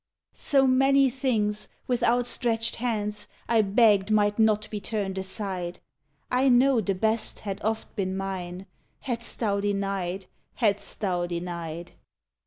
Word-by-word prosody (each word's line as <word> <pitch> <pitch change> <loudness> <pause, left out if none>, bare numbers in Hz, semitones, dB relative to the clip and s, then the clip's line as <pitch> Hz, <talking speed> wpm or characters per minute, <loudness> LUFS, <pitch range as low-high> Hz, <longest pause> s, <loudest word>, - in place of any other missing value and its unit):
So 275 -2 +2
many 270 +1 +4
things, 215 -5 -1 0.2
with 250 -1 0
outstretched 235 -1 +1
hands, 210 -3 -2 0.2
I 230 -1 +4
begged 205 -1 +4
might 210 0 +2
not 215 -1 +3
be 210 - -3
turned 200 -2 -3
aside. 190 -2 -4 0.5
I 260 +2 +3
know 250 0 +5
the 195 -1 -1
best 220 +3 -1
had 195 -2 -5
oft 220 +1 -2
been 190 -2 -2
mine 190 -1 -5 0.4
Hadst 235 -2 -3
Thou 205 -3 +1
denied! 195 -2 -2 0.3
Hadst 205 -4 -1
Thou 180 -4 0
denied! 170 -1 -5
210 Hz, 130 wpm, -26 LUFS, 195-235 Hz, 0.5 s, know